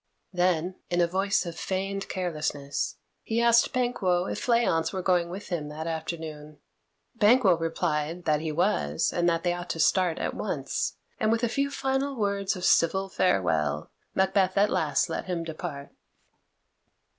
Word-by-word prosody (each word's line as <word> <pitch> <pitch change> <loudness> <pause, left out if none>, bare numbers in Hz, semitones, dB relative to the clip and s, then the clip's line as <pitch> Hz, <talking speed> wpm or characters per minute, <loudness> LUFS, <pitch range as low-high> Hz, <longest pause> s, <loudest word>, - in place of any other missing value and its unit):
Then, 180 0 +1
in 175 - 0
a 175 - +5
voice 195 +3 +1
of 170 -1 -5
feigned 195 +1 -3
carelessness, 155 -6 -2 0.3
he 225 +1 -1
asked 235 0 +4
Banquo 195 -8 +1
if - - -3
Fleance 200 -10 +2
were 185 -1 -4
going 175 -2 +2
with 195 +4 -7
him 165 -5 -2
that 155 +1 -6
afternoon. 160 -2 -5 0.6
Banquo 220 -3 +5
replied 165 0 -2
that 150 -1 +2
he 160 -1 -2
was, 80 - +1
and 175 0 +2
that 165 -1 0
they 175 -1 +1
ought 175 0 -6
to 165 - -3
start 180 +1 +3
at - - -2
once, - - -2 0.2
and 215 - +2
with 230 +1 +1
a - - +4
few 275 +4 0
final 270 0 -1
words 200 -3 0
of 180 - -4
civil 190 +4 +3
farewell 80 - +1 0.2
Macbeth 190 0 +2
at 205 +1 +4
last - - +1
let - - -4
him 175 -3 -2
depart. 155 -3 -6
180 Hz, 160 wpm, -27 LUFS, 160-200 Hz, 0.6 s, a